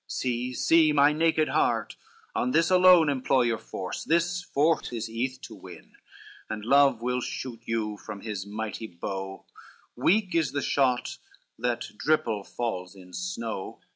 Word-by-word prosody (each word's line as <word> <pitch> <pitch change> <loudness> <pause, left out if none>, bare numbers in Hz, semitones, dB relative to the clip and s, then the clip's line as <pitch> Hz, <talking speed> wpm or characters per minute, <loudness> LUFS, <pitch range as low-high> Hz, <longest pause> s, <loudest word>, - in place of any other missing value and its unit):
See, 125 0 -2
see, 160 +1 +4
my 145 0 +5
naked 160 0 +2
heart, - - +1 0.4
on 125 - 0
this 165 +3 +3
alone 180 -3 +7
Employ 135 -2 +2
your 115 -2 0
force 95 -4 -6
this 170 +2 +1
fort 155 -3 +1
is 115 -2 -4
eath 125 +3 -3
to - - -9
win, - - -13 0.6
And 105 -1 -5
love 135 -2 +4
will 125 +1 0
shoot 120 -2 -5
you 110 -2 -2
from 105 -2 -9
his 105 -4 -4
mighty 110 +1 -5
bow, 95 +2 -6 0.5
Weak 195 0 +2
is 165 -3 +1
the 140 -2 -1
shot 130 -3 0 0.4
that 120 0 -1
dripile 150 -10 +1
falls 95 -7 -4
in 90 -1 -15
snow. 115 - -5
125 Hz, 150 wpm, -27 LUFS, 110-155 Hz, 0.6 s, alone